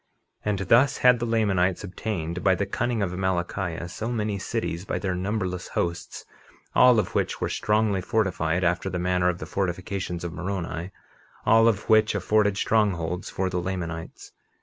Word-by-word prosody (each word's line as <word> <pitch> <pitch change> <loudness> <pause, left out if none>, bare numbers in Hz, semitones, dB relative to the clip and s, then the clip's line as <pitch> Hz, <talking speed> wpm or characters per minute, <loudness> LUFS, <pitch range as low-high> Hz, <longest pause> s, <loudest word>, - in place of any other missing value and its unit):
51:27 - - -3
And 100 -2 0
thus 125 +6 +5
had 125 -1 +5
the 120 - -2
Lamanites 95 -6 +1
obtained, 90 -4 -4
by 95 -1 +4
the 100 - -1
cunning 120 -1 -1
of 90 - -1
Amalickiah, 90 -2 -2
so 110 +6 -4
many 105 -3 -1
cities, 85 -1 -3
by - - -3
their 95 -2 -2
numberless 90 -1 -2
hosts, 85 0 -3 0.5
all 125 -2 +6
of 110 - 0
which - - -1
were - - -1
strongly 105 -2 +1
fortified 90 -5 0
after 90 +2 +1
the 90 - -3
manner 90 0 +1
of 90 - -2
the - - -6
fortifications 95 -1 -3
of 85 -1 -4
Moroni; 90 -2 -4 0.6
all 115 0 +6
of 105 -3 +1
which 110 -1 +4
afforded 105 +1 +2
strongholds 90 -6 0
for 95 - -1
the 90 -1 -2
Lamanites. 85 -3 -5
95 Hz, 170 wpm, -25 LUFS, 90-105 Hz, 0.6 s, all